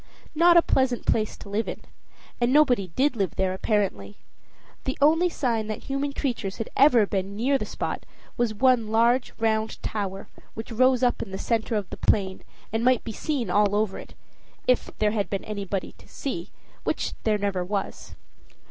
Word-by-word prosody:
Not 340 +2 +6
a 335 - +7
pleasant 260 -2 +1
place 215 -1 0
to - - -11
live 205 +3 -1
in - - -5 0.6
and 240 +1 +3
nobody 255 -9 +4
did 275 0 +2
live 195 -6 -1
there, 190 -1 0
apparently. 190 - -1 0.7
The 265 - -2
only 325 +5 +4
sign 235 -9 -1
that 215 - -5
human 275 +1 -2
creatures 240 -9 -3
had 225 - -5
ever 250 -6 +6
been 195 0 -3
near 270 +5 +2
the - - -4
spot - - -4 0.3
was 240 -2 +1
one 240 0 +3
large 235 +3 +2
round 220 -1 0
tower 195 -2 -4 0.3
which 225 +2 -7
rose 255 +2 +3
up 245 - +2
in 215 - -5
the 190 - -5
center 230 +2 -1
of 205 -3 -1
the - - -6
plain, 190 -2 +1 0.3
and 225 +1 0
might 255 -1 +3
be 230 - -5
seen 245 -3 -2
all 205 0 +3
over 210 -2 0
it - - -12 0.5
if 250 - +2
there 210 -1 +2
had 205 -2 -1
been 195 - -3
anybody 200 -2 -4
to - - -17
see, 200 - -5 0.3
which - - -1
there 215 -2 +1
never 200 -3 -1
was. 195 +1 -4
220 Hz, 185 wpm, -25 LUFS, 200-255 Hz, 0.7 s, a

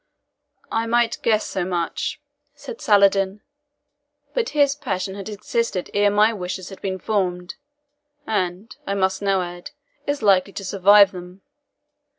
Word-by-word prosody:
"I 225 +1 0
might 235 0 +1
guess 215 -2 +2
so 190 - -2
much," 175 -2 -2 0.4
said 475 - -9
Saladin; 200 -1 +3 0.9
"but - - 0
his 285 -1 +4
passion 190 -9 -3
had 200 +1 -7
existed 210 -2 -2
ere 205 0 +3
my 210 +2 +3
wishes 185 -2 -5
had 195 - -11
been 190 -1 -3
formed 180 -3 -2 0.7
and, 200 +3 -2
I 200 - -1
must 190 0 0
now 195 -2 +1
add, 175 +4 -8 0.4
is 285 -4 -2
likely 195 -1 +3
to 195 - -6
survive 200 +1 +6
them. 180 +1 -11
195 Hz, 140 wpm, -22 LUFS, 185-215 Hz, 0.9 s, survive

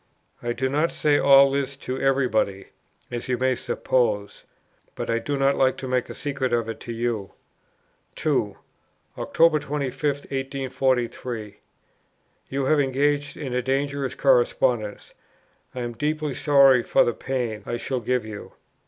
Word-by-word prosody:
"I 120 - -2
do 130 +2 -1
not 150 +5 +1
say 145 -1 +2
all 140 0 +7
this 140 0 -2
to 130 -1 -5
every 135 -1 +2
body, 100 -4 -1 0.4
as 120 -1 -4
you 125 -1 0
may 130 +1 +2
suppose; 105 -5 -1 0.5
but - - -3
I 115 - +1
do 145 +3 -2
not 135 0 +3
like 130 -1 +2
to 130 - -6
make 125 -1 -1
a - - -7
secret 135 -4 -2
of 115 -1 +1
it 115 - -5
to 120 - -7
you." 115 -4 -3 0.8
2. - - 0 0.6
"Oct. 165 -2 +3
25, 140 -2 -4
1843. 130 -6 -2 0.9
You 135 0 -1
have 150 +2 +3
engaged 145 +1 0
in 135 -5 -5
a 125 - +1
dangerous 135 +1 -1
correspondence; - - +1 0.6
I 125 - -3
am 120 -1 -4
deeply 150 +2 -2
sorry 135 -2 +5
for - - +3
the 120 - 0
pain 120 -5 -3
I 120 - -2
shall 130 +2 -2
give 125 0 -1
you. 110 -2 -9
130 Hz, 155 wpm, -24 LUFS, 120-140 Hz, 0.9 s, all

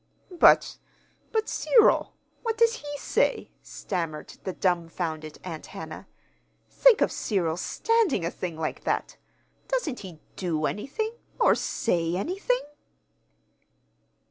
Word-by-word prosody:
"But 340 - +5 0.5
but 440 -1 0
Cyril! 465 -4 +4 0.3
What 455 -2 -2
does 465 0 +4
he 290 -5 -6
say?" - - 0
stammered 165 -5 -4
the 190 - -2
dumfounded 165 -4 -2
Aunt 165 -4 -7
Hannah. - - -8 0.6
"Think - - +5
of - - +3
Cyril's 175 -5 -1
standing 450 - +1
a 170 - -1
thing 170 -3 -5
like 160 -1 -3
that! - - -2 0.5
Doesn't 420 - -1
he 180 -5 -10 0.2
do 160 -5 -1
anything 425 - -2 0.3
or - - +6
say 170 -5 0
anything?" 390 - 0
190 Hz, 115 wpm, -27 LUFS, -, 0.6 s, or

